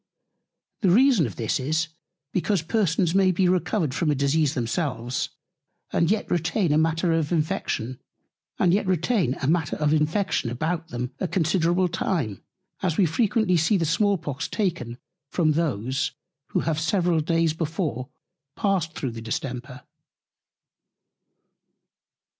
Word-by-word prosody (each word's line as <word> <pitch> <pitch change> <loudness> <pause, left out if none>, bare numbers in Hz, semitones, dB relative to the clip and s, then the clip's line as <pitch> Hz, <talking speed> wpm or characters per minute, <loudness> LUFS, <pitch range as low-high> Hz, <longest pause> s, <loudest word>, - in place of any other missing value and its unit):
The 195 - +2
reason 230 - +5
of 100 - -8
this 115 +3 -1
is, 155 +4 0 0.4
because 185 -1 +1
Persons 175 -3 +1
may 190 -1 +4
be 185 +1 +2
recovered 180 -4 +1
from 165 +2 0
a 150 - +2
Disease 140 +2 +1
themselves, 125 -1 -2 0.6
and 170 - +2
yet 215 0 +1
retain 165 -2 +2
Matter 165 +1 +1
of 160 -1 0
Infection 130 -6 -1 0.6
about 175 - +1 1.2
them 125 -4 -4
a 185 - -1
considerable 175 +1 +2
Time; 165 - -2 0.4
as 180 -5 0
we 195 - +5
frequently 210 +2 +2
see 165 +6 +3
the 165 - 0
Small 200 +5 +2
Pox 150 -2 -4
taken 165 - -2 0.3
from 160 -1 +2
those, 140 -4 -1 0.3
who - - 0
have 160 -1 -1
several 170 +1 +1
Days 165 0 +1
before 155 - -3 0.5
passed 185 -5 0
through 135 -5 -3
the 115 0 -8
Distemper. 125 +2 -5
165 Hz, 120 wpm, -25 LUFS, 140-185 Hz, 1.2 s, reason